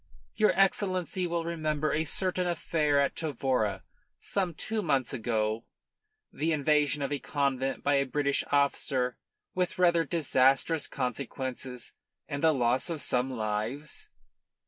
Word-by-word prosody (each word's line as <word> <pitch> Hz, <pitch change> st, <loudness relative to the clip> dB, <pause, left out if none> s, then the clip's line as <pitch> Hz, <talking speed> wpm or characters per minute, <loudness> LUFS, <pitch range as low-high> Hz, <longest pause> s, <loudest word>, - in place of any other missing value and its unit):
Your 215 Hz, -1 st, +4 dB
Excellency 185 Hz, -2 st, +1 dB
will 170 Hz, -1 st, -1 dB
remember 155 Hz, -2 st, -1 dB
a 160 Hz, +1 st, +1 dB
certain 185 Hz, +3 st, -1 dB
affair 155 Hz, -3 st, +1 dB
at 140 Hz, -1 st, +1 dB
Tavora 130 Hz, -, -1 dB, 0.3 s
some 185 Hz, -5 st, -2 dB
two 220 Hz, +6 st, -2 dB
months 140 Hz, -, 0 dB
ago 110 Hz, -2 st, -1 dB, 0.7 s
the 160 Hz, +2 st, 0 dB
invasion 150 Hz, -1 st, +2 dB
of 140 Hz, -, -2 dB
a 145 Hz, -, -1 dB
convent 135 Hz, -2 st, -1 dB
by 145 Hz, -, +2 dB
a 140 Hz, -, +2 dB
British 140 Hz, +1 st, +1 dB
officer 135 Hz, -3 st, +1 dB, 0.3 s
with 180 Hz, -1 st, -1 dB
rather 170 Hz, -2 st, +4 dB
disastrous 145 Hz, -1 st, +2 dB
consequences 125 Hz, -1 st, -4 dB, 0.3 s
and 140 Hz, 0 st, -4 dB
the 160 Hz, -, +5 dB
loss 130 Hz, +1 st, +1 dB
of 165 Hz, -2 st, -3 dB
some 125 Hz, -1 st, 0 dB
lives." 115 Hz, +5 st, -3 dB
145 Hz, 130 wpm, -29 LUFS, 130-165 Hz, 0.7 s, the